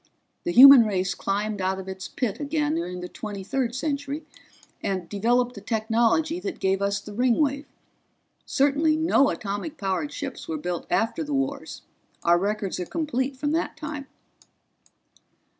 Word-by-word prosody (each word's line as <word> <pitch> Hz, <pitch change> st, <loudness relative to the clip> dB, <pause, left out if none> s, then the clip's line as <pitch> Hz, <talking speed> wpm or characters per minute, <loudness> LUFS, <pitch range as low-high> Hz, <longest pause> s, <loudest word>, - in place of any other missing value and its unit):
The 345 Hz, -, 0 dB
human 275 Hz, -2 st, +10 dB
race 190 Hz, -2 st, 0 dB
climbed 205 Hz, +1 st, -2 dB
out 190 Hz, +1 st, 0 dB
of 190 Hz, 0 st, -8 dB
its 190 Hz, 0 st, -6 dB
pit 245 Hz, -7 st, -3 dB
again 300 Hz, +1 st, -1 dB
during 180 Hz, -, -3 dB
the 180 Hz, -, -5 dB
Twenty 205 Hz, 0 st, -7 dB
third 245 Hz, +3 st, -2 dB
Century 285 Hz, +2 st, -3 dB, 0.6 s
and 185 Hz, -3 st, -2 dB
developed 240 Hz, +6 st, +1 dB
the 200 Hz, -, -10 dB
technology 230 Hz, -, +1 dB
that 375 Hz, -1 st, -5 dB
gave 190 Hz, 0 st, +1 dB
us 200 Hz, 0 st, 0 dB
the 205 Hz, +1 st, -10 dB
Ringwave. 275 Hz, +5 st, +1 dB, 0.8 s
Certainly 290 Hz, +3 st, +2 dB
no 315 Hz, -3 st, +3 dB
atomic 210 Hz, +10 st, -4 dB
powered 195 Hz, +8 st, -2 dB
ships 275 Hz, -3 st, -6 dB
were 160 Hz, -, -3 dB
built 175 Hz, +2 st, -4 dB
after 225 Hz, +8 st, 0 dB
the 295 Hz, -2 st, -3 dB
wars 275 Hz, +1 st, -3 dB, 0.4 s
our 175 Hz, 0 st, +4 dB
records 205 Hz, 0 st, -2 dB
are 180 Hz, -, -4 dB
complete 275 Hz, -4 st, -2 dB
from 290 Hz, +2 st, -1 dB
that 325 Hz, -1 st, -1 dB
time." 300 Hz, -3 st, -6 dB
245 Hz, 155 wpm, -25 LUFS, 200-290 Hz, 0.8 s, human